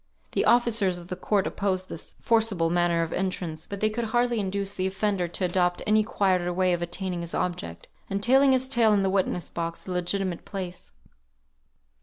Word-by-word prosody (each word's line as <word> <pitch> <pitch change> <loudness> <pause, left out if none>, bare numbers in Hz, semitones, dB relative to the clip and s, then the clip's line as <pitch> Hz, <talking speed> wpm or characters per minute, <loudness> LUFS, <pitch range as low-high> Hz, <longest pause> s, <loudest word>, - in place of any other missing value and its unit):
The - - +1
officers 230 -6 +3
of 175 0 -11
the 180 - -3
court 195 +1 0
opposed 185 -2 -1
this 160 - -8
forcible 215 -8 +2
manner 175 -1 +2
of 165 - -4
entrance, 175 -4 -3
but 200 -1 -6
they 215 - +3
could 235 +2 -2
hardly 240 +1 +1
induce 200 0 -2
the 185 -1 -1
offender 190 -1 0
to 180 +2 -1
adopt 175 0 +1
any 215 0 +4
quieter 185 -4 +1
way 185 0 +2
of 175 - -1
attaining 175 +1 -3
his 170 0 -4
object, 85 - -3 0.2
and 200 +1 -2
telling 270 +3 +5
his 260 0 +2
tale 235 -5 +3
in 200 -1 +3
the 190 - +1
witness 185 -2 -1
box, 170 0 -4
the 185 - -7
legitimate 180 0 -1
place. 185 -3 -6
190 Hz, 190 wpm, -26 LUFS, 175-210 Hz, 0.2 s, telling